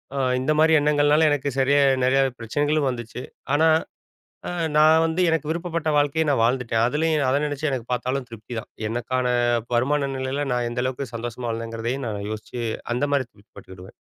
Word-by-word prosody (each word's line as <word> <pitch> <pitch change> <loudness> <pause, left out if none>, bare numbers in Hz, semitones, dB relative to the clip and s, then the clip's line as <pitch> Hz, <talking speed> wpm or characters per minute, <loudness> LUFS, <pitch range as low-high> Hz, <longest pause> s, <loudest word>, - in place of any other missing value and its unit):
அ - - -3 0.2
இந்த 130 +4 0
மாரி 160 0 +5
எண்ணங்கள்னால, 150 +1 +3
எனக்கு 140 -1 0
சரியா 140 +2 +4 0.2
நெறைய 135 +1 +3 0.2
பிரச்சனைகளும் 145 +5 0
வந்துச்சு. 120 0 -6 0.3
ஆனா 160 +2 +4 0.8
அ - - -2 0.3
நான் 160 +1 +6
வந்து 165 +3 -2
எனக்கு 160 -2 0
விருப்பப்பட்ட 170 -1 -2
வாழ்க்கைய 145 +2 +1
நான் 130 -5 +2
வாழ்ந்துட்டேன். 120 -2 +1
அதுலேயும் 150 +1 +1
அத 135 - +2
நெனச்சு 145 +1 -2
எனக்கு 125 -3 -3
பார்த்தாலும் 125 +1 -2
திருப்திதான். 115 0 -8 0.2
எனக்கான 125 +2 -2 0.5
வருமான 140 +3 +1
நிலைல 130 +2 -2
நான் 120 -1 0
எந்த 125 +1 -2
அளவுக்கு 130 -1 -4
சந்தோஷமா 120 +1 -5
வாழ்ந்தேங்கிறதயும் 115 +3 -4
நான் 100 -1 -4
யோசிச்சு, 110 +3 -7 0.3
அந்த 125 +4 0
மாதிரி 140 -2 +2
திருப்தி 100 +1 -24
பட்டுக்கிடுவேன். 95 -1 -12
130 Hz, 160 wpm, -23 LUFS, 120-150 Hz, 0.8 s, நான்